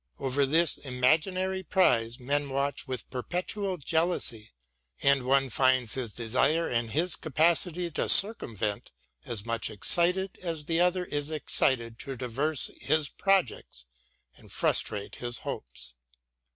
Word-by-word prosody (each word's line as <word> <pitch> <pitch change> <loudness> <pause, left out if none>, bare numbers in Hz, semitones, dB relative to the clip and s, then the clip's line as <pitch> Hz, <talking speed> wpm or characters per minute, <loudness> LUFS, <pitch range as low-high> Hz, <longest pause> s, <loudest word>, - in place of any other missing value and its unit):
Over 135 +1 0
this 165 +4 +3
imaginary 165 +9 0
prize 120 - +2
men 140 +3 -1
watch 140 +1 -2
with 130 -4 -5
perpetual 180 - -3
jealousy; 155 -8 -1 0.5
and 140 -1 +4
one 135 -1 +2
finds 130 -2 +2
his 125 -4 -2
desire 130 +9 +1
and 115 -1 -1
his 165 +8 0
capacity 170 +3 0
to - - -1
circumvent 110 - +2 0.4
as 115 -3 -2
much 115 -1 -2
eidted 180 - +2
as 165 -4 -4
the 165 +1 0
other 180 +1 +2
is 145 -2 -3
excited 120 -6 0
to 135 -1 -6
traverse 130 +5 -1
his 155 -2 +1
projects 185 - -1 0.5
and - - -16
frustrate 100 -1 -1
his 120 -1 -3
hopes. 65 +1 -5
140 Hz, 125 wpm, -28 LUFS, 120-170 Hz, 0.5 s, and